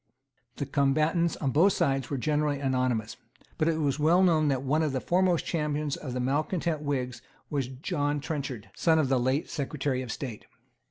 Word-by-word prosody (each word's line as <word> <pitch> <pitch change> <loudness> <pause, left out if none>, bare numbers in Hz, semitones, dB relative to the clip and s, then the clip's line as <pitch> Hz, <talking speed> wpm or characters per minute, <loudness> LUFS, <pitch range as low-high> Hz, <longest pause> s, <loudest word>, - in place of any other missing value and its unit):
The 140 - -3
combatants 155 +5 +2
on 135 -3 -1
both 180 +8 +4
sides 135 -2 0
were 140 - -2
generally 150 +2 0
anonymous. 130 -5 0 0.4
But 155 - +2
it 165 -1 +2
was 145 -2 0
well 170 +5 +4
known 160 -4 +4
that 135 -2 0
one 150 +4 +1
of 155 -3 0
the 130 - 0
foremost 180 +2 +2
champions 150 -3 -1
of 130 -5 -6
the 125 - -2
malecontent 155 +4 0
Whigs 130 -4 -2 0.3
was 140 -4 0
John 145 +2 -2
Trenchard, 140 -7 -5
son 165 -1 +3
of 150 -4 +2
the 135 -1 +3
late 130 +5 0
Secretary 140 -2 -2
of 125 -3 -5
State. 120 -5 -6
145 Hz, 180 wpm, -28 LUFS, 130-155 Hz, 0.4 s, both